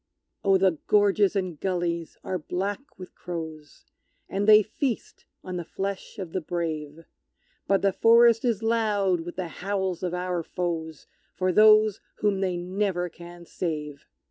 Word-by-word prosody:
Oh! 195 -1 +5
the 185 -4 +2
gorges 205 -1 +3
and 185 -6 -2
gullies 175 -3 -2
are 185 - -3
black 200 - -4
with 185 -1 -10
crows, 160 -4 -8 0.4
And 200 +2 -2
they 215 0 +8
feast 235 +3 -4 0.2
on 185 -1 -5
the 175 - -3
flesh 195 +5 -5
of 185 -5 -6
the 185 - -1
brave; 160 -2 -4 0.6
But 195 -1 +2
the 195 -1 +3
forest 230 0 +5
is 230 -4 0
loud 210 -5 +1
with 175 +1 -8
the 180 -2 -4
howls 190 -2 -2
of 180 -1 -2
our 180 -1 -2
foes 165 -3 -4 0.3
For 185 0 +1
those 215 +1 +6 0.2
whom 205 -2 0
they 185 -2 -1
never 180 0 -1
can 175 +1 -12
save! 150 -5 -5
185 Hz, 150 wpm, -26 LUFS, 170-205 Hz, 0.6 s, they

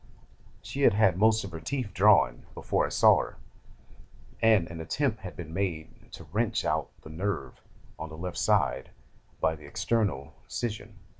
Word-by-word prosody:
She 140 - -5
had 135 - +6
had 105 -4 +4
most 110 +1 +4
of 100 - -7
her 80 - -6
teeth 120 - -3
drawn 95 - +4
before - - 0
I - - -7
saw - - +5
her, - - -6 1.0
and 110 -7 +4
an 85 -1 -6
attempt 115 - -1
had 90 - -8
been 80 -2 -8
made 85 -4 -4
to - - -9
wrench 110 +3 0
out - - 0
the 80 - -10
nerve 95 +5 -4 0.4
on 80 0 -5
the 80 - -10
left 90 +1 -5
side 65 - +1 0.5
by 80 - +1
the 75 -2 -13
external 105 +6 -1
scission. 110 -2 -5
95 Hz, 165 wpm, -28 LUFS, 80-110 Hz, 1.0 s, had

